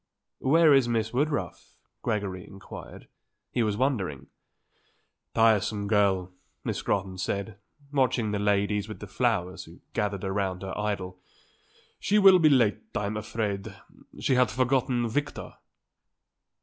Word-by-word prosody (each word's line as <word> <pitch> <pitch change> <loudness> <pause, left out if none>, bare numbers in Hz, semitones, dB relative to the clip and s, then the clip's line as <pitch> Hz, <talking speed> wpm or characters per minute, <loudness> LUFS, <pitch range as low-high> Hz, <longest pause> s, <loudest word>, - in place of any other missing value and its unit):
"Where 155 +2 +5
is 135 -3 +4
Miss 115 -1 -1
Woodruff?" 145 +4 -2 0.3
Gregory 100 -4 -2
inquired. 100 0 -11 0.4
He 120 - 0
was 105 -2 0
wondering. 95 - -1 1.1
"Tiresome 110 -2 +3
girl," 100 -3 +2 0.3
Miss - - -2
Scrotton 95 -2 -2
said, 100 +2 -3 0.3
watching 125 -5 +1
the 105 - -1
ladies 105 0 +1
with 110 - -7
the - - -7
flowers 100 -4 -1
who - - -15
gathered 100 -2 -1
around 95 -1 -2
her 95 - -5
idol. 100 -3 -3 0.8
"She 210 - +2
will 195 -3 +8
be 155 -2 +6
late, 120 -7 +3 0.2
I'm 105 0 -1
afraid. 105 -2 -3 0.4
She - - +1
had 125 0 +4
forgotten 125 -2 +1
Victor." 145 +6 -3
105 Hz, 125 wpm, -27 LUFS, 100-125 Hz, 1.1 s, will